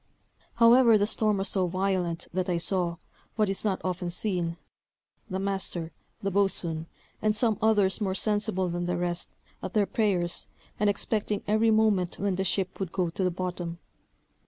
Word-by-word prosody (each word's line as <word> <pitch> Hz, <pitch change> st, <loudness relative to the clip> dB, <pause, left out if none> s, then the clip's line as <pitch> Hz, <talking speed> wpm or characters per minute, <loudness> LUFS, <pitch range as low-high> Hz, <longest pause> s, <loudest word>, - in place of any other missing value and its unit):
However 235 Hz, -1 st, +6 dB
the 205 Hz, -, +2 dB
storm 215 Hz, -1 st, +1 dB
was 195 Hz, +1 st, -1 dB
so 185 Hz, -2 st, +1 dB
violent, 185 Hz, -2 st, -1 dB
that 185 Hz, +1 st, -1 dB
I 175 Hz, -, +1 dB
saw, 175 Hz, 0 st, 0 dB, 0.4 s
what 215 Hz, -3 st, +2 dB
is 195 Hz, -, 0 dB
not 200 Hz, -3 st, 0 dB
often 180 Hz, -1 st, -2 dB
seen, 175 Hz, -2 st, -1 dB, 0.7 s
the 185 Hz, -, -2 dB
master, 190 Hz, -4 st, -1 dB, 0.3 s
the 195 Hz, -, 0 dB
boatswain, 175 Hz, -5 st, +1 dB, 0.3 s
and 215 Hz, 0 st, +2 dB
some 220 Hz, -2 st, +2 dB
others 210 Hz, -2 st, +3 dB
more 190 Hz, -2 st, 0 dB
sensible 205 Hz, -2 st, +1 dB
than 175 Hz, 0 st, -3 dB
the 180 Hz, 0 st, -1 dB
rest, 175 Hz, 0 st, -2 dB, 0.3 s
at -, -, -6 dB
their 210 Hz, -2 st, +4 dB
prayers, 185 Hz, -6 st, 0 dB, 0.3 s
and 210 Hz, 0 st, +3 dB
expecting 205 Hz, 0 st, -1 dB
every 215 Hz, +2 st, +3 dB
moment 215 Hz, -5 st, +2 dB
when 200 Hz, -1 st, 0 dB
the 190 Hz, +1 st, -1 dB
ship 190 Hz, -1 st, -2 dB
would 190 Hz, -4 st, -3 dB
go 180 Hz, -3 st, -1 dB
to 190 Hz, -, -2 dB
the 180 Hz, -, +3 dB
bottom. 175 Hz, -1 st, -4 dB
190 Hz, 170 wpm, -27 LUFS, 175-210 Hz, 0.7 s, However